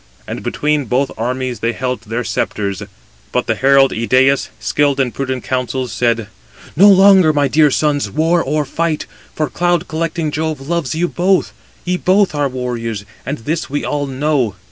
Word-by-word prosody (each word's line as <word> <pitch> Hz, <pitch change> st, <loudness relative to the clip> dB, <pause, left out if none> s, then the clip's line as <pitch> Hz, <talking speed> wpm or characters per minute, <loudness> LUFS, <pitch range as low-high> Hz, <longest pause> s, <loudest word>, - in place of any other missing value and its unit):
And -, -, -5 dB
between 150 Hz, -1 st, -1 dB
both 130 Hz, +4 st, 0 dB
armies 125 Hz, +2 st, -3 dB
they 115 Hz, +1 st, -1 dB
held 125 Hz, -2 st, -3 dB
their 115 Hz, +2 st, -4 dB
sceptres, 100 Hz, -3 st, -2 dB, 0.5 s
but -, -, 0 dB
the -, -, +1 dB
herald 135 Hz, 0 st, +4 dB
Idæus, 130 Hz, +4 st, +2 dB
skilled 145 Hz, -1 st, +1 dB
in 130 Hz, -3 st, +1 dB
prudent 130 Hz, -1 st, -3 dB
counsels, 130 Hz, 0 st, -2 dB
said: 115 Hz, -2 st, 0 dB, 0.5 s
"No 200 Hz, +6 st, +7 dB
longer, 190 Hz, -4 st, +6 dB
my 145 Hz, -2 st, +1 dB
dear 150 Hz, +2 st, +4 dB
sons, 145 Hz, +1 st, 0 dB
war 165 Hz, +3 st, +1 dB
or 150 Hz, +2 st, -1 dB
fight, 160 Hz, +2 st, -2 dB, 0.3 s
for 155 Hz, -, 0 dB
cloud 175 Hz, +3 st, 0 dB
collecting 160 Hz, 0 st, -2 dB
Jove 155 Hz, -1 st, -2 dB
loves 155 Hz, 0 st, -2 dB
you 175 Hz, +2 st, +1 dB
both: 185 Hz, +2 st, +1 dB, 0.3 s
ye 180 Hz, 0 st, 0 dB
both 190 Hz, +1 st, +2 dB
are 145 Hz, -2 st, 0 dB
warriors, 120 Hz, -5 st, -4 dB, 0.2 s
and 140 Hz, +3 st, -2 dB
this 160 Hz, +2 st, -2 dB
we 145 Hz, +2 st, -2 dB
all 145 Hz, -1 st, -2 dB
know. 135 Hz, -5 st, 0 dB
140 Hz, 165 wpm, -17 LUFS, 125-160 Hz, 0.5 s, No